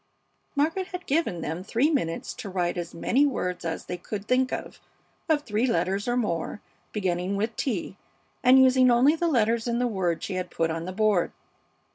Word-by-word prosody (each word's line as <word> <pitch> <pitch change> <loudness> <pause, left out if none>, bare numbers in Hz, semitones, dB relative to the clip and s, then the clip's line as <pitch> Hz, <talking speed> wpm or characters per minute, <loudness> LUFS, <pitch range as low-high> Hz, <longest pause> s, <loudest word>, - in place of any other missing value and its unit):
Margaret 325 +6 +1
had 360 0 -7
given 280 - 0
them 160 +4 -4
three 250 +10 +1
minutes 165 - -1
to 220 -6 -7
write 180 -2 -1
as 175 -1 -5
many 250 +11 +2
words 180 -11 -1
as 165 -1 -4
they 180 - -4
could 205 +3 -6
think 255 0 +2
of, - - -5 0.5
of 300 -2 +2
three 225 0 0
letters 200 -3 0
or 240 0 +1
more, 205 -5 -2 0.3
beginning 185 -1 -1
with 220 +3 -1
T, 200 -6 -3 0.4
and 255 +1 +7
using 260 -1 +6
only 250 +6 +5
the 340 +1 0
letters 230 -5 +2
in 235 0 0
the 245 - +1
word 190 -7 -1
she 195 - -3
had 185 -1 -3
put 165 -2 0
on 165 +1 -3
the 185 - -4
board. 205 -2 +2
215 Hz, 190 wpm, -26 LUFS, 180-255 Hz, 0.5 s, and